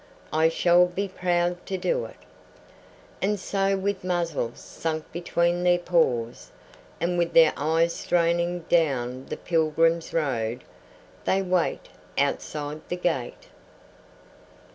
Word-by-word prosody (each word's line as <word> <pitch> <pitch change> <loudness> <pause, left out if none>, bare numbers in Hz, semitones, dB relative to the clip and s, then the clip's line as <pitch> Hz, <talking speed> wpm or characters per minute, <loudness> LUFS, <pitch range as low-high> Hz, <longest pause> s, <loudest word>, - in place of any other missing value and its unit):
"I 160 +1 +4
shall 175 +2 +4
be 195 +3 -3
proud 175 -1 -1
to 190 - -2
do - - 0
it." - - -12 1.0
And 205 +1 0
so 195 0 0
with 195 0 -2
muzzles 170 -9 -2
sunk 160 -1 -4
between 175 0 0
their 175 0 +4
paws, 135 -10 0 0.5
and 175 +1 0
with 170 0 0
their 165 -2 +7
eyes 165 +3 +1
straining 175 0 +1
down 135 -7 0
the - - -5
pilgrims' 165 0 +1
road, 125 -6 -1 0.6
they 195 +1 +2
wait 180 -2 0 0.3
outside 150 0 -2
the 175 - -1
gate. 160 -9 -3
170 Hz, 120 wpm, -25 LUFS, 155-180 Hz, 1.0 s, their